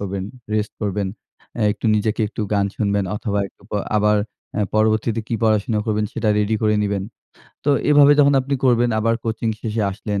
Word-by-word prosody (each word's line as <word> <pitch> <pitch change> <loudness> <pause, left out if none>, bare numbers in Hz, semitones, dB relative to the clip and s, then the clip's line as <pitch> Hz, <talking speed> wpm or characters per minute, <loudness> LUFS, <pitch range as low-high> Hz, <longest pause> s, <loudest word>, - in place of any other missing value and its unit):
করবেন, 95 -1 -3 0.3
রেস্ট 105 -1 -1
করবেন 100 -1 -1 0.5
এ - - +2
একটু 115 - -5
নিজেকে 105 +2 0
একটু 110 - -7
গান 100 -1 +2
শুনবেন 100 -1 0
অথবা 105 -1 -2
একটু - - -28
প - - -14 0.2
আবার 105 0 +3 0.4
আ - - +1
পরবর্তীতে 110 +1 +2
কি 115 - -1
পড়াশোনা 110 0 +2
করবেন 105 -1 0
সেটা 110 - -1
রেডি 105 +1 +1
করে 105 0 +3
নিবেন। 100 -2 -1 0.6
তো 145 - +3 0.2
এভাবে 145 0 +7
যখন 140 0 +5
আপনি 140 +2 -2
করবেন 120 -1 +3
আবার 115 +1 +2
কোচিং 115 0 -2
শেষে 110 0 -2
আসলেন 100 0 -3
110 Hz, 180 wpm, -21 LUFS, 105-115 Hz, 0.6 s, এভাবে